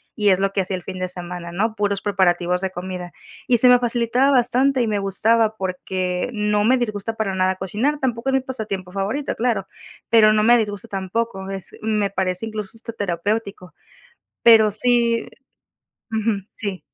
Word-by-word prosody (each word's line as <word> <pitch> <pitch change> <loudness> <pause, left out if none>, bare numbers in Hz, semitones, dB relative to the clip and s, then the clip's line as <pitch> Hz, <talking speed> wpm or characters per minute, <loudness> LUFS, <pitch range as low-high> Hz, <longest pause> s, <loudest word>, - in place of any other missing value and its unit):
y 210 -2 +2
es 190 0 +4
lo 195 0 0
que 195 - +1
hacía 190 +1 -3
el 180 - -10
fin 185 -1 -7
de 185 - -1
semana, 175 -1 -7
¿no? 215 +5 -1
Puros 205 -2 -1
preparativos 180 -2 +1
de 190 - -1
comida. 180 -1 -6 0.4
Y 240 - +4
se 250 - +5
me 245 0 +7
facilitaba 240 +2 +1
bastante 255 +1 +3
y - - -1
me 210 -1 0
gustaba 220 +3 +2
porque 185 +1 -2
no 210 0 +1
me 255 +2 +4
disgusta 225 -2 -3
para 215 -3 -2
nada 185 0 +1
cocinar. 215 +11 -1
Tampoco 245 0 -1
es - - 0
mi 265 - +3
pasatiempo 210 -8 -5
favorito, 200 +9 -2
claro, 230 -5 0 0.4
pero 215 -2 +6
no 215 0 +2
me 240 +1 +6
disgusta 205 0 -3
tampoco. 195 0 -3
Es 195 -1 -7
me 210 -3 0
parece 185 +1 -2
incluso 215 -2 -6
hasta 230 0 -8
terapéutico. 200 -1 -3 0.7
Pero 220 -2 +7
sí 235 0 +1 0.8
ujú, 220 -3 -1
sí. 200 -4 -5
210 Hz, 175 wpm, -21 LUFS, 190-230 Hz, 0.8 s, me